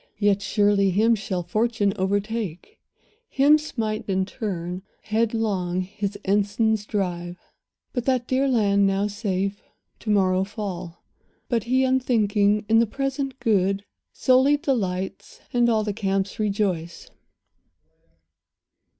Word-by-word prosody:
Yet 205 -1 +2
surely 205 0 +2
him 215 +5 +3
shall 195 -4 -2
fortune 215 +2 0
overtake, 205 - -3 0.5
Him 290 +3 +5
smite 220 -8 -3
in 190 0 +1
turn, 185 -5 -4 0.2
headlong 215 -5 0
his 200 +2 -4
ensigns 205 +2 +1
drive; 175 -3 -3 0.6
And 245 -3 -2
that 255 -2 +1
dear 265 +1 +1
land, 200 -5 +3
now 195 +1 +1
safe, 200 -1 -2 0.4
to 220 - -7
morrow 190 -2 +3
fall. 190 -4 -6 0.5
But 230 -4 0
he, 260 +2 +2
unthinking, 215 -5 +2
in 225 +1 +5
the 230 - +3
present 275 +2 -3
good 195 -2 +1 0.3
Solely 265 +3 +4
delights, 190 -10 -3
and 240 -1 +3
all 220 -2 +2
the 210 -1 -2
camps 195 -1 -2
rejoice. 195 -5 -2
205 Hz, 115 wpm, -24 LUFS, 195-230 Hz, 0.6 s, Him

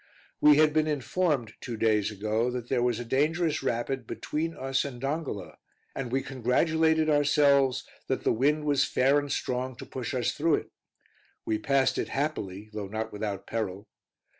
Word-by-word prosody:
We 150 -1 +7
had 155 -1 +5
been 155 0 +2
informed, 150 -4 0
two 120 -3 -5
days 105 -2 +2
ago, 110 +3 -1
that 125 -1 -5
there 125 -2 +1
was 120 -2 +1
a 120 - -5
dangerous 155 +6 +1
rapid 130 -1 -2
between 165 +2 -3
us 135 0 0
and 135 -4 -6
Dongola, 135 - -4 0.4
and 125 -3 -4
we 135 +1 0
congratulated 160 +5 +2
ourselves 140 -3 +3 0.2
that 130 - -1
the - - +3
wind 145 +6 +2
was 145 -2 +3
fair 135 +3 +3
and 145 -1 -5
strong 125 0 -2
to - - -9
push 130 +1 -5
us 125 -2 +1
through 155 0 +2
it; - - -6 0.7
we 110 -1 0
passed 135 +3 +2
it - - -2
happily, 105 -9 -3
though 105 -2 -4
not 110 +2 -4
without 105 -1 -4
peril. 105 -3 -3
130 Hz, 170 wpm, -28 LUFS, 115-150 Hz, 0.7 s, We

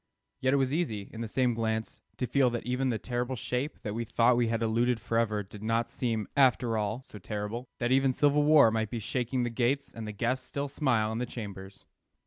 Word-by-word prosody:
Yet 130 +1 +2
it - - +4
was 135 0 +1
easy, 110 - -2
in 115 - -6
the 115 - -3
same 125 +2 +1
glance, 110 -1 -2 0.2
to 125 - -1
feel 130 +1 +3
that 120 -1 -4
even 125 +2 0
the 115 - 0
terrible 125 +2 -2
shape 125 +4 -3
that 105 - -3
we 115 +2 -2
thought 115 +2 +3
we 120 -1 +2
had 115 0 0
eluded 115 +2 +1
forever 110 -1 0
did 100 +1 -12
not 115 +2 0
seem, 115 -5 -2
after 125 -4 +3
all, 110 +4 -2
so 105 - -11
terrible; 105 +5 -4
that 120 0 -1
even 135 0 +4
civil 145 +2 +3
war 145 -6 +6
might 110 -1 -1
be 120 - -4
shaking 125 +3 -1
the 120 - -1
gates 130 +4 0
and 115 -1 -6
the - - -3
guests 120 +5 -1
still 140 0 -3
smile 125 -7 +1
in 110 - -2
the 125 - -2
chambers. 100 -4 -8
120 Hz, 225 wpm, -29 LUFS, 110-130 Hz, 0.2 s, war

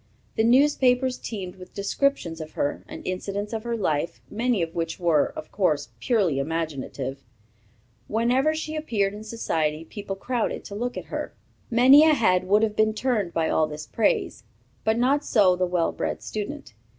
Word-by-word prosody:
The 220 - +2
newspapers 255 0 +3
teemed 190 -4 -6
with 185 -1 -13
descriptions 200 - 0
of 155 - -8
her, 145 - -2
and - - -9
incidents 200 +3 -3
of 220 - -2
her 235 -1 -2
life, 155 - -1
many 230 -4 +1
of 165 0 -5
which 165 -1 -3
were, 165 -5 +3
of 155 - -8
course, 155 -8 +1
purely 195 - +1
imaginative. 140 -3 -3 0.8
Whenever 250 +7 +2
she 315 0 -4
appeared 215 -10 0
in 210 +1 -8
society, 160 -8 -2
people 200 +2 -6
crowded 240 +3 -2
to 200 - -8
look 245 +4 -3
at - - -5
her. - - -4 0.3
Many 260 +5 +7
a 315 -1 +5
head 185 -7 +2
would 205 +3 +4
have 215 -1 0
been 215 0 +2
turned 220 -7 0
by 165 -1 0
all 155 - +2
this 155 0 -7
praise; 220 +5 0 0.4
not 250 +6 +3
so 195 -9 +4
the 180 0 0
well 175 -2 +1
bred - - -3
student. 205 - -5
205 Hz, 170 wpm, -25 LUFS, 165-240 Hz, 0.8 s, Many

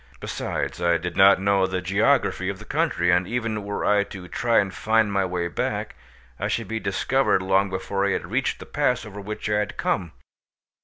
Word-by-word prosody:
Besides, - - -4
I 85 -1 +3
did 90 0 -5
not 95 0 +6
know 100 -1 +2
the 95 0 -2
geography 100 +1 +1
of 100 - -4
the - - -12
country, 90 +1 +1
and 90 +1 +2
even 115 -3 -2
were 100 0 -3
I 105 -1 +4
to 95 -3 -9
try 115 +5 +1
and 95 -2 +2
find 110 0 +1
my 100 -1 +2
way 90 -1 -2
back, 85 - -3 0.5
I - - -1
should - - -2
be 110 0 -3
discovered 100 +1 +1
long 95 +1 +2
before 95 +1 -2
I 100 - +2
had 95 -1 -2
reached 130 +2 0
the - - -10
pass 125 -5 0
over 105 -1 -8
which 105 +2 -5
I 105 0 +1
had 105 - -3
come. 90 -4 -1
100 Hz, 205 wpm, -24 LUFS, 95-110 Hz, 0.5 s, not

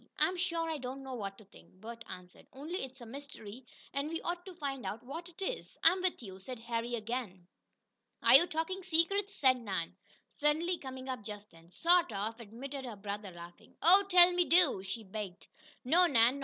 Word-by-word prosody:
"I'm 370 - +2
sure 340 -2 -1
I 320 -2 -2
don't 260 +1 -6
know 265 -1 -6
what 200 -5 -5
to 215 - -16
think," 200 - -19
Bert 230 +2 -9
answered. 180 0 -11
"Only 310 +8 -5
it's 265 0 -9
a - - -8
mystery, 250 -2 -9 0.3
and 280 +2 -1
we 330 0 -3
ought 350 0 -3
to 370 - -9
find 275 -6 -4
out 205 +4 -5
what 325 +7 -7
it 335 - -18
is." - - -4
"I'm 365 +3 +5
with 365 -8 -1
you," 190 -3 -9
said 250 +5 -7
Harry 235 +1 -2
again. 220 -5 -4 0.8
"Are - - +6
you 345 - +9
talking 340 +4 -2
secrets?" 370 +2 0
asked 255 -1 +5
Nan, 190 -7 -4 0.3
suddenly 320 +4 0
coming 260 -1 -8
up 255 -4 -4
just 210 0 -8
then. 165 0 -18
"Sort 340 - +3
of," 215 +3 -3
admitted 260 +5 -7
her 240 -4 -6
brother, 200 0 -5
laughing. 175 -1 -13
"Oh, 365 +5 +8
tell 355 -1 +9
me 355 0 +3
do!" 345 - +5
she 195 +4 -5
begged. 195 -2 -7 0.4
"No, 345 +7 +5
Nan. 245 -1 +4
260 Hz, 195 wpm, -33 LUFS, 215-335 Hz, 0.8 s, you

